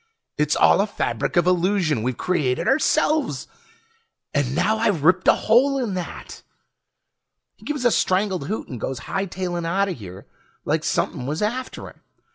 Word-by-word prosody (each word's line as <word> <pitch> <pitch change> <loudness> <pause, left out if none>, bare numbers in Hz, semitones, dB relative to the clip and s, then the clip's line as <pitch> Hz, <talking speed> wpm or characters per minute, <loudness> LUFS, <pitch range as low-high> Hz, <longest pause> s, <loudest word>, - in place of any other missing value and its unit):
It's - - +1
all - - +5
a - - 0
fabric - - -2
of 175 - +4
illusion 180 - +1
we've 125 +1 -2
created 145 -9 0
ourselves! 295 - +1 0.9
And 140 -3 0
now 220 +6 +1
I've 205 -9 +1
ripped 180 +4 +3
a - - +7
hole 265 +5 +3
in 240 -7 -2
that!" 180 -2 -7 1.1
He - - -19
gives 295 -4 -3
a 240 - +5
strangled 185 -6 0
hoot 215 - -4
and 125 -4 -8
goes 130 -3 -4
hightailin' 185 -2 -3
outta 190 +4 0
here 100 - -9 0.4
like - - 0
somepin' 125 - -1
was 155 +7 -2
after 250 +5 -3
him. - - -15
185 Hz, 155 wpm, -22 LUFS, 145-220 Hz, 1.1 s, a